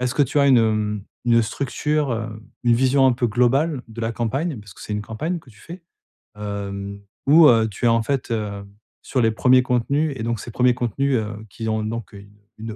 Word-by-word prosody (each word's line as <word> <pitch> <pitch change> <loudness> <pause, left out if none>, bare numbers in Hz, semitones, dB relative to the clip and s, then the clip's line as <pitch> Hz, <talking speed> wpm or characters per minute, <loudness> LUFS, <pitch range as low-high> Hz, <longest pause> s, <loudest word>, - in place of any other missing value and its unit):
Est-ce 125 0 -1
que 145 - +5
tu 145 +2 0
as 140 - +4
une, 130 - +6
hem, 105 -2 0 0.2
une 115 -1 +4
structure, 140 +4 -1
heu, 110 -1 -5 0.2
une 120 -1 +5
vision 130 +2 +3
un 130 - +4
peu 120 0 0
globale 130 +5 +1
de 115 +1 -9
la 115 0 -1
campagne? 135 +5 -2
Parce 100 -3 -14
que - - -16
c'est 105 - -6
une 105 0 -2
campagne 155 +12 -3
que 140 - -19
tu 105 - -20
fais. 170 0 -11 0.5
Hem 100 -1 -5 0.2
ou, 155 +2 +7
heu, 115 -2 +4
tu 105 - -4
es - - +6
en 115 -1 +2
fait, 135 +1 -2
heu, 105 -3 -3 0.4
sur 130 - -1
les 115 -1 +3
1ers 130 +3 +4
contenus. 140 +5 0
Et - - -6
donc, 115 -2 -2
ces 120 - -8
1ers 125 +1 +3
contenus, 125 +3 0
heu, 110 0 -5
qui 115 +2 -6
ont 110 0 0
heu 110 - -3
donc 115 -2 -6
une 100 +1 -14 0.2
une 110 -1 -6
115 Hz, 230 wpm, -22 LUFS, 110-135 Hz, 0.5 s, ou